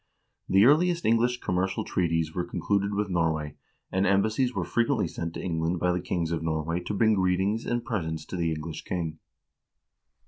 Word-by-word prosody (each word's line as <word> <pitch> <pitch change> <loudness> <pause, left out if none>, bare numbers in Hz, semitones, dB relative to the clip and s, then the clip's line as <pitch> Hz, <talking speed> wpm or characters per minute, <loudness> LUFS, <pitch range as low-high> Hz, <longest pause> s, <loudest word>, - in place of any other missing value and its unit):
The 95 +3 +6
earliest 170 +5 +4
English 120 +2 +2
commercial 95 0 -1
treaties 80 -3 0
were 90 - -1
concluded 100 +3 -1
with 105 0 0
Norway, 80 -4 0 0.4
and 95 +2 +1
embassies 110 +6 +2
were - - -2
frequently 115 -3 +1
sent 85 +1 -5
to - - -4
Eng 85 -3 -2
land 85 +2 0
by 90 +1 +2
the 90 0 -1
kings 85 -2 -2
of 85 - -1
Norway 80 +1 -1
to 100 +4 -4
bring 110 +1 +4
greetings 95 +3 +1
and 120 -1 -1
presents 80 -9 -3
to - - -7
the 85 -2 0
English 80 0 -5
king. 80 -3 -3
90 Hz, 180 wpm, -27 LUFS, 80-105 Hz, 0.4 s, The